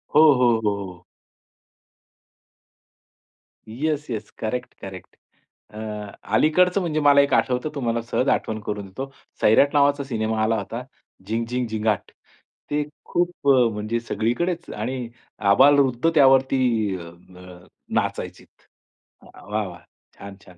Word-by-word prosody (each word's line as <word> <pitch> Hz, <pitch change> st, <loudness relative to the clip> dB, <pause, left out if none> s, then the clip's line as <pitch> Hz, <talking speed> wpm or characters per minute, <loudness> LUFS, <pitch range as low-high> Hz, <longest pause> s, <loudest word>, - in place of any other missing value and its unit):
हो, 150 Hz, -, +8 dB
हो, 120 Hz, -3 st, +3 dB
हो, 105 Hz, -1 st, +2 dB
हो. 90 Hz, -2 st, -12 dB, 2.6 s
Yes, 150 Hz, +6 st, -2 dB
yes. 110 Hz, -3 st, -5 dB
Correct, 125 Hz, +3 st, -4 dB
correct. 95 Hz, -2 st, -10 dB, 0.6 s
अ, -, -, -7 dB, 0.5 s
अलीकडचं 180 Hz, -, +3 dB
म्हणजे 155 Hz, -3 st, -1 dB
मला 145 Hz, -1 st, +6 dB
एक 140 Hz, -1 st, 0 dB
आठवतं 125 Hz, +4 st, +1 dB
तुम्हाला 120 Hz, -4 st, -1 dB
सहज 125 Hz, +3 st, -1 dB
आठवण 110 Hz, 0 st, 0 dB
करून 105 Hz, -1 st, -4 dB
देतो. 135 Hz, +8 st, -7 dB, 0.3 s
सैराट 140 Hz, +6 st, +4 dB
नावाचा 145 Hz, -1 st, +3 dB
सिनेमा 110 Hz, -4 st, -2 dB
आला 110 Hz, +1 st, +2 dB
होता. 115 Hz, +4 st, -5 dB, 0.4 s
झिंग, 115 Hz, +3 st, -2 dB
झिंग, 125 Hz, 0 st, -2 dB
झिंगाट. 110 Hz, -2 st, -1 dB, 0.6 s
ते 150 Hz, 0 st, +1 dB, 0.2 s
खूप 175 Hz, -4 st, -2 dB
अ, 125 Hz, -3 st, +5 dB
म्हणजे 110 Hz, +3 st, -2 dB
सगळीकडेच 165 Hz, +10 st, -2 dB
आणि 125 Hz, +3 st, -4 dB, 0.4 s
आबालवृद्ध 135 Hz, +3 st, +4 dB
त्यावरती 130 Hz, -7 st, +3 dB
अ, 85 Hz, -, -9 dB, 0.4 s
अ, 90 Hz, -1 st, -13 dB, 0.3 s
नाचायचेत. -, -, -2 dB, 0.8 s
वाह! 105 Hz, +2 st, -5 dB
वाह! 85 Hz, -1 st, -10 dB, 0.4 s
छान, 100 Hz, 0 st, -9 dB
छान. 90 Hz, -, -17 dB
120 Hz, 125 wpm, -23 LUFS, 110-140 Hz, 2.6 s, हो